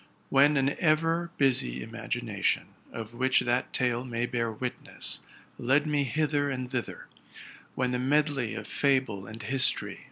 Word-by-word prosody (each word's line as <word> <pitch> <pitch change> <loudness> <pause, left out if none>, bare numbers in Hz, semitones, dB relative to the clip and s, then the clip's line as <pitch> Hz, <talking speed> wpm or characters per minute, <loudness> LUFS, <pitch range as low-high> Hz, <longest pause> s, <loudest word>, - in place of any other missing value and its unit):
When 140 +2 +5
an 135 0 +3
ever 165 +1 +2
busy 65 - +2
imagination, - - -2 0.2
of 115 0 -7
which 130 +2 +3
that 120 +1 0
tale 125 -1 0
may 120 -2 -2
bear 115 -2 -1
witness, 125 +3 -5 0.4
led 135 +5 +3
me 145 -2 +1
hither 145 +1 +1
and 130 -2 -3
thither; 125 -2 -4 0.7
when 125 -1 0
the 125 - 0
medley 140 -2 +1
'of - - -5
fable 130 -9 +1
and 110 0 -8
histor 130 +4 +1
y. - - -9
130 Hz, 150 wpm, -29 LUFS, 120-145 Hz, 0.7 s, When